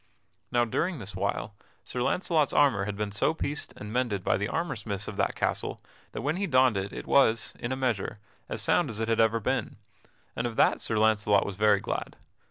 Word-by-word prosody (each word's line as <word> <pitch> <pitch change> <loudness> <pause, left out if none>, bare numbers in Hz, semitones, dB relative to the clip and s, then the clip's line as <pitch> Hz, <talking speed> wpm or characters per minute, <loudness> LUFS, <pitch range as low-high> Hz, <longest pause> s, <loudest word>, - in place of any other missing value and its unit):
Now, 120 -1 +3
during 165 +9 -1
this 100 -5 -6
while, 100 +2 -2 0.3
Sir 125 - -3
Launcelot's 160 +1 +1
armor 130 -10 +3
had 100 0 -4
been 105 0 -2
so 105 +10 +1
pieced 145 -2 -3
and 105 +1 -7
mended 120 -7 0
by - - +2
the 100 +2 -1
armor 165 0 -2
smiths 100 -3 -5
of 105 - -5
that - - 0
castle - - -2 0.3
that - - -5
when 150 +5 0
he 200 +1 -1
donned 130 - +4
it 100 +1 -2
it - - -7
was, 115 -5 +3
in 120 - -3
a - - 0
measure, 120 -5 -1 0.3
as - - -2
sound - - +2
as 110 - -5
it 115 - -1
had 115 - +1
ever 115 0 +4
been, 105 - -1 0.6
and 120 - -1
of 115 - -6
that - - +3
Sir 110 - -1
Launcelot 105 -2 +3
was 100 - -4
very 105 0 +4
glad. - - -4
110 Hz, 215 wpm, -28 LUFS, 100-130 Hz, 0.6 s, donned